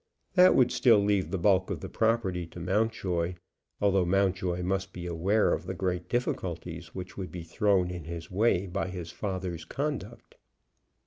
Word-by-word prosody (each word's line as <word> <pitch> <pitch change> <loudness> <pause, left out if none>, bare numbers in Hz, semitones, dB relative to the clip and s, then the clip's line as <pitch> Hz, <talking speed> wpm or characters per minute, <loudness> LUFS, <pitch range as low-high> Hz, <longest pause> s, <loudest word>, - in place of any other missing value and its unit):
That 185 0 +7
would 125 -2 +4
still 115 -4 +5
leave 100 -4 +1
the 95 - -1
bulk 95 +1 +3
of - - -3
the - - -5
property 105 -7 0
to 85 - -10
Mountjoy, 90 -2 0 0.4
although 100 -2 +3
Mountjoy 90 -1 +1
must 95 +1 -2
be 90 -1 -6
aware 90 +5 +2
of - - -3
the - - -3
great 90 -2 -2
difficulties 85 -8 -3
which 90 0 -7
would 95 -2 -5
be 90 -2 -6
thrown 90 +1 +1
in 85 -3 -6
his 85 -1 -7
way 100 -1 +2
by 90 0 -2
his 90 -3 -6
father's 95 -5 -4
conduct. 145 - -5
95 Hz, 170 wpm, -29 LUFS, 90-100 Hz, 0.4 s, That